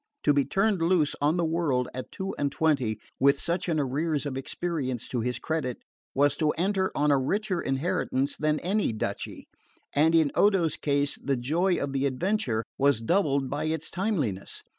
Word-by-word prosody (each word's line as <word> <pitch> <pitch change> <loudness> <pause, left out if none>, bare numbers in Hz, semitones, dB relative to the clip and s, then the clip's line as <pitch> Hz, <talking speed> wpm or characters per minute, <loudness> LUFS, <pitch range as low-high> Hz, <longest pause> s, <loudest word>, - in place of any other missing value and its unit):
To 145 - +4
be 140 -1 +2
turned 195 -2 +1
loose 165 -3 +2
on 150 +4 +2
the 170 - +1
world 155 -7 0
at 130 0 -6
two 190 0 -4
and 140 -1 0
twenty, 130 -9 +1 0.2
with 140 0 +4
such 175 +2 -1
an 160 -2 +1
arrears 145 +2 -1
of 140 -2 -3
experience 135 -3 -3
to 120 - -1
his 125 +1 -1
credit, 140 -4 -2 0.4
was 145 +1 +3
to 155 -2 +2
enter 190 +2 0
on 150 0 +2
a 140 - +4
richer 190 +6 -1
inheritance 135 -1 0
than 155 0 0
any 195 - 0
duchy; 110 - -4 0.5
and 160 +3 +4
in 155 -4 +4
Odo's 190 -6 +3
case 145 -1 0
the 140 -2 0
joy 170 +9 +1
of 140 -1 -3
the 135 0 +1
adventure 135 - 0 0.2
was 140 -4 +3
doubled 140 - +1
by - - -3
its 160 0 -2
timeliness. 150 - -2
150 Hz, 180 wpm, -27 LUFS, 135-175 Hz, 0.5 s, To